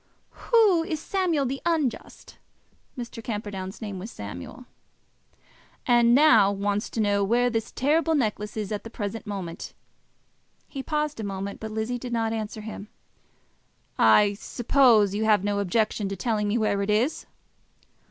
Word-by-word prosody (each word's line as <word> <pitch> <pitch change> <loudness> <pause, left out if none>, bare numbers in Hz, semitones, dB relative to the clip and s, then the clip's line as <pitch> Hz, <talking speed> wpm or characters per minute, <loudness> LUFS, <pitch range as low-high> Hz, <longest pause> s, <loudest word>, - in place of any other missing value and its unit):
"Who 425 -8 +5
is 325 -3 -3
Samuel 340 -5 0
the 270 +2 -3
Unjust." 310 -9 -3 0.6
Mr. 235 -2 -7
Camperdown's 205 -2 -5
name 200 -3 -5
was 205 +5 -7
Samuel. 105 - -9 1.2
"And 240 -1 +5
now 230 -9 +6
wants 205 +1 -2
to - - -5
know 205 -1 +2
where 240 +4 +2
this 225 -1 -2
terrible 315 +4 +1
necklace 210 -5 -2
is 210 -2 -3
at 210 - -3
this 225 - -9
present 215 0 -5
moment." 190 -5 -6 0.9
He 275 - -6
paused 300 -1 -2
a - - -3
moment, 195 0 -5
but 220 - -6
Lizzie 220 +3 -3
did 245 0 -6
not 225 -1 0
answer 215 0 -4
him. 210 -1 -8 1.1
"I 205 -1 +5
suppose 225 -1 +3
you 215 +2 -1
have 210 -3 +3
no 205 0 0
objection 205 +1 0
to 195 - -4
telling 215 -1 -1
me 205 +3 +1
where 210 -3 +1
it 200 - -2
is." 225 +9 0
220 Hz, 150 wpm, -25 LUFS, 205-250 Hz, 1.2 s, now